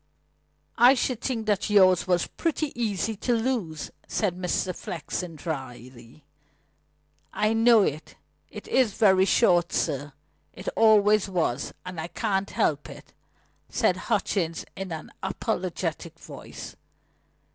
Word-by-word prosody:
"I 245 +3 +8
should 250 -2 -1
think 230 -4 -2
that 210 -2 0
yours 190 -3 +5
was 180 -1 +2
pretty 310 -3 -2
easy 220 -2 -1
to 240 +3 0
lose," 225 - -2 0.2
said 200 -5 -1
Mr. 180 0 -1
Flexen 170 +1 -5
dryly. 130 -3 -8 1.1
"I 215 +1 +1
know 225 -1 +5
it. 155 -2 -3 0.3
It - - -10
is 250 -6 +2
very 190 -4 +4
short, 175 -5 +3
sir. 140 +1 -1 0.4
It 185 - -11
always 215 -2 +4
was; 160 -8 -1
and 180 -3 -5
I 160 - -5
can't 195 0 -1
help - - 0
it," - - -13 0.6
said - - +2
Hutchings 165 -4 -1
in 190 -2 -6
an 160 -1 -7
apologetic 180 -4 -3
voice. - - -10
190 Hz, 125 wpm, -26 LUFS, 165-220 Hz, 1.1 s, I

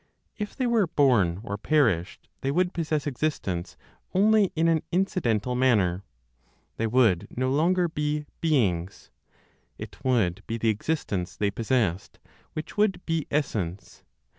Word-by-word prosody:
If 210 -1 -5
they 260 - -1
were 230 -6 +2
born, 110 - +2
or 100 -2 -5
perished, 105 - +1
they 135 - -1
would 180 +5 +1
possess 155 -4 -1
existence 110 - -3 0.4
only 210 0 +4
in 165 +1 +2
an 165 -2 +3
incidental 125 - 0
manner, 105 -8 +2 0.7
they 115 - 0
would 110 -7 +3
no 130 +1 +1
longer 175 +5 +2
be 150 -1 -2
beings; 100 - 0 0.7
it - - -10
would 110 -9 +1
be 115 - -2
the 115 0 +1
existence 105 - -2
they 100 -1 0
possessed 110 -5 -1 0.4
which 155 +5 -7
would 195 -4 +1
be 165 -2 -1
essence. 100 - -3
130 Hz, 135 wpm, -26 LUFS, 100-160 Hz, 0.7 s, only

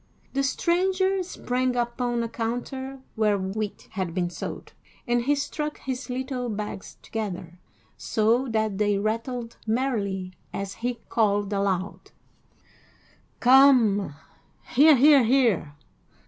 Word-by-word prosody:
The 275 - +1
stranger 375 +7 +1
sprang 255 -8 -2
upon 240 0 -1
a - - -2
counter 250 +4 -4
where 210 -2 +2
wheat 200 +2 -4
had 185 -3 -3
been 175 -2 -1
sold, - - -7 0.3
and 240 0 +2
he 290 +2 +3
struck 300 +1 -3
his 260 0 -5
little 255 -1 -3
bags 210 -2 -6
together, 180 -5 -5 0.4
so 230 +4 +1
that 220 -3 -1
they 205 -1 +2
rattled 230 +3 -3
merrily 205 -6 -1 0.2
as 195 0 -4
he 245 +1 -1
called 205 -2 +1
aloud: 195 -1 -2 1.3
"Come, 245 - +5 0.5
hear, 300 +4 +7
hear, 280 +1 +6
hear! 225 - +2
235 Hz, 115 wpm, -25 LUFS, 205-260 Hz, 1.3 s, hear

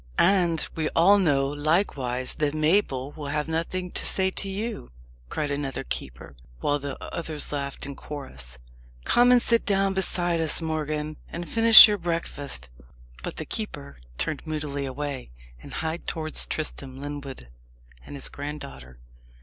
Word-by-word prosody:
"And 175 -4 +3
we 155 -1 -1
all 195 +5 +6
know, 140 -7 +2
likewise, 145 -4 +1
that 150 0 -1
Mabel 155 -4 +1
will 150 -2 -7
have 150 +1 -1
nothing 170 +3 -3
to - - -1
say 190 0 +1
to 195 - -4
you!" 210 - -4 0.4
cried 150 -2 -2
another 140 -2 -3
keeper, - - -6 0.2
while 145 - 0
the 140 -1 -5 0.2
others 155 -3 -2
laughed 140 -1 -4
in 140 - -7
chorus. 65 - -8 0.5
"Come 245 - +5
and 250 - +7
sit 230 -1 +2
down 195 -1 +1
beside 175 -3 0
us, 160 - +2
Morgan, 155 -1 -3
and 170 0 -6
finish 225 -1 +10
your 205 -1 -1
breakfast." 165 -4 -3 0.5
But - - -5
the - - -5
keeper 70 +2 -5 0.2
turned 155 +1 -2
moodily 145 -3 -3
away, 140 - -5 0.3
and - - -11
hied 160 +1 -4
towards 155 -2 -2
Tristram 135 -4 -5
Lyndwood 140 - -7 0.5
and - - -9
his 140 - +1
granddaughter. 65 - -8
150 Hz, 150 wpm, -26 LUFS, 140-175 Hz, 0.5 s, finish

